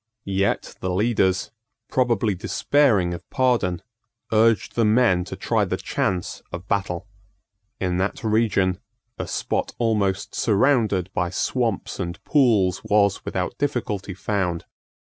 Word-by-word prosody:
Yet 100 0 -1
the 95 - -3
leaders, 95 -1 +1 0.4
probably 120 -5 +1
despairing 110 -1 +2
of 85 - -9
pardon, 120 -10 +1 0.5
urged 110 -2 +3
the 115 - +1
men 105 -5 +3
to - - -6
try - - 0
the - - -1
chance 90 -2 -2
of 85 +2 -7
battle. 100 -2 -2 0.7
In 90 -2 0
that 95 +6 -2
region, 105 -4 +2 0.4
a - - -3
spot - - -2
almost 100 -4 0
surrounded 105 -5 +2
by 90 -2 0
swamps 115 +3 -1
and 85 -1 -4
pools 110 - +3
was 100 -2 +2
without 95 +6 -3
difficulty 105 -9 -2
found. 95 -4 -2
100 Hz, 125 wpm, -23 LUFS, 95-115 Hz, 0.7 s, urged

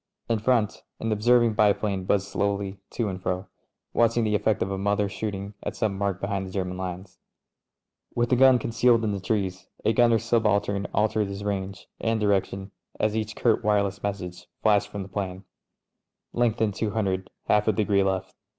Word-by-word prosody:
In 115 -2 +1
front, 110 -2 +1 0.2
an 115 - -2
observing 120 +2 +4
biplane 100 -2 +2
buzzed 100 0 +1
slowly 100 -1 -2
to 115 - -2
and 95 -2 -4
fro, 90 +1 -2 0.5
watching 115 0 +3
the 105 -1 +1
effect 105 0 +2
of 95 - -4
a 95 - -2
mother 100 +1 +1
^ - - -13
shooting 100 -1 -4
at - - -4
some 105 -3 0
mark 100 -2 -1
behind 100 -1 -2
the 95 - -6
German 90 -1 -2
lines. 90 0 -6 1.0
With 120 0 +1
the - - +6
gun 130 0 +7
con 115 - -4
cealed 115 0 +4
in 110 - +1
the 100 - -2
trees, 95 -2 -2 0.2
a 110 - +4
gunner 120 -1 +5
subaltern 105 -3 +1
altered 105 0 +1
his 100 0 -6
range 100 -1 -4
and 115 -1 0
direction 100 -1 0 0.3
as 110 0 +1
each 110 0 -2
curt 115 -3 +2
wireless 100 -2 +1
message 95 -3 -5 0.2
flashed 105 -2 +4
from 100 -1 -5
the - - -9
'plane. 95 -1 -4 0.9
"Lengthen 115 -2 +1
200 100 -3 -1
— - - -56
half 105 +1 +3
a - - +6
degree 100 -1 +2
left." 95 -1 -1
100 Hz, 185 wpm, -26 LUFS, 95-110 Hz, 1.0 s, gun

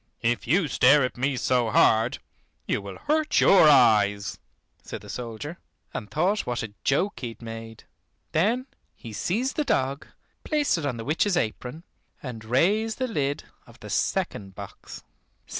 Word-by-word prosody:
"If 120 0 0
you 170 +5 +3
stare 135 +1 +5
at 125 - -2
me 130 +1 -1
so 125 -1 +1
hard, 110 +2 +3 0.5
you - - -1
will 100 -1 -8
hurt 305 0 +1
your 185 -6 +7
eyes," 105 -7 +4 0.4
said - - -8
the - - -13
soldier, 125 +7 -6 0.3
and 105 - -5
thought 190 +7 0
what 120 -2 -2
a 110 -2 -7
joke 185 +9 +1
he 125 - -4
had 115 0 -10
made. 115 -1 -8 0.5
Then 225 +11 +1 0.3
he 115 - -10
seized 230 - -1
the 305 - +2
dog, 135 - -1 0.4
placed 295 - +1
it 145 - -2
on 125 -4 -3
the 115 - -6
witch's 175 +5 +1
apron, 125 +5 -3 0.4
and 120 -5 -7
raised 200 - +1
the 255 - -1
lid 145 - -2 0.2
of - - -17
the - - -9
second 95 -2 -1
box. - - -10
135 Hz, 160 wpm, -26 LUFS, 115-180 Hz, 0.5 s, your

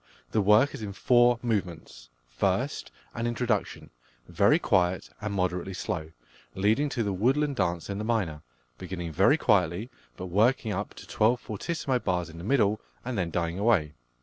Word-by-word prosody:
The 110 - +2
work 105 +8 +4
is 140 - -7
in 100 -2 -5
four 120 +3 +4
movements. 90 - -3 0.2
First, - - -1 0.2
an 120 0 -2
introduction, 120 -3 -2 0.4
very - - +4
quiet 90 -9 +1
and 105 - -3
moderately 90 -1 -2
slow, 80 -3 -4 0.5
leading 110 +9 +2
to 120 -4 -1
the 100 -2 -1
"Woodland 135 +8 +1
Dance" 85 -4 -1
in 100 0 -4
the - - -3
minor, 100 -10 -1 0.4
beginning 90 -2 -5
very 95 - +4
quietly, 100 - +1 0.3
but 95 - -6
working 110 +4 +2
up 100 +3 -4
to - - -11
twelve 115 +3 +2
ff 125 - -5 0.2
bars 90 -3 -1
in 85 - -11
the - - -8
middle, 105 -2 +2 0.2
and 125 -1 -3
then 90 -5 -1
dying 85 +1 -2
away. 100 -9 +2
100 Hz, 165 wpm, -27 LUFS, 90-120 Hz, 0.5 s, work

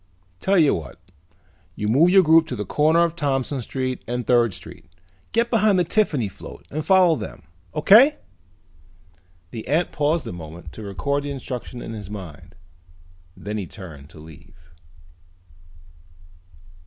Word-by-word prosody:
"Tell 195 - +2
you 155 -5 +5
what. 80 - -6 0.8
You 105 - -3
move 140 +11 +4
your 190 +1 +6
group 160 0 +5
to - - -4
the 105 - -4
corner 155 - +3
of 170 -1 -1
Thompson 135 -3 -1
Street 130 +1 -4
and 125 0 -3
Third 120 -5 +3
Street. - - -12 0.4
Get 235 +1 +1
behind 215 -4 +3
the 180 - +3
Tiffany 160 - 0
float 95 - -12
and 155 +2 -3
follow 185 -3 +5
them, - - -8 0.3
okay?" 265 +9 +6 1.3
The 115 -2 -7
ant 160 +6 +1
paused 150 +2 0
a - - -6
moment 80 -1 -10
to - - -9
record 110 +9 -2
the 145 - -5
instructions 125 -3 -6
in 115 - -7
his 105 -3 -8
mind. 90 -3 -10 0.8
Then 105 +1 -5
he 95 - -5
turned 80 -9 -11
to 80 - -15
leave. 80 +2 -16
130 Hz, 150 wpm, -22 LUFS, 100-165 Hz, 1.3 s, your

